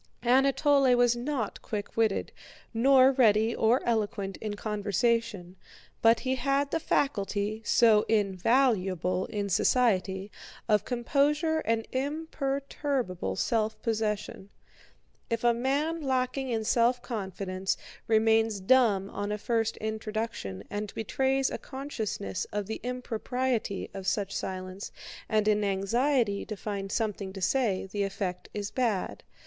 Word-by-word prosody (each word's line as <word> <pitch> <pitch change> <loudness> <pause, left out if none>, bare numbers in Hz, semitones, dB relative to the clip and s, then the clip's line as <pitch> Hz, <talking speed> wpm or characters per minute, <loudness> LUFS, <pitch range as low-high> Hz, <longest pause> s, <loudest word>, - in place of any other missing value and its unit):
Anatole 270 +1 +4
was 245 -1 +4
not 245 -2 -3
quick 205 -2 -5
witted, 220 -3 +1 0.4
nor 260 +3 +6
ready 225 -3 +3
or 230 +4 +3
eloquent 210 -4 -1
in 215 -1 -4
conversation, 210 -2 -1 0.4
but 230 0 +5
he 260 -1 0
had 275 +2 0
the 325 - +1
faculty, 215 -8 -1
so 220 -1 +5
invaluable 195 - +1
in 205 -1 -3
society, 195 -2 +1 0.4
of 210 -2 +3
composure 290 +6 +1
and 225 0 0
imperturbable 275 - -2
self 220 - 0
possession. 210 -3 -2 0.8
If 230 -1 -1
a 240 0 +5
man 285 +7 0
lacking 260 -1 -1
in 225 -2 -1
self 240 +2 +2
confidence 190 -4 -3 0.3
remains 220 -1 +3
dumb 200 -2 +3
on 205 +1 -3
a 210 - -1
first 225 +1 -1
introduction 215 - -4
and 205 0 -3
betrays 265 +4 0
a - - -4
consciousness 240 - -4
of 205 -1 -2
the 220 +3 -5
impropriety 250 -2 -2
of 195 -1 -6
such 195 -1 -1
silence 185 +1 -5 0.4
and 215 -1 +2
an 210 -1 +3
anxiety 205 +3 +1
to 215 - -5
find 195 -1 -4
something 205 -4 -2
to 195 - -7
say, 210 -3 +1
the 200 +2 -4
effect 190 -2 -3
is 205 0 -4
bad. 220 -5 -1
220 Hz, 125 wpm, -28 LUFS, 200-255 Hz, 0.8 s, nor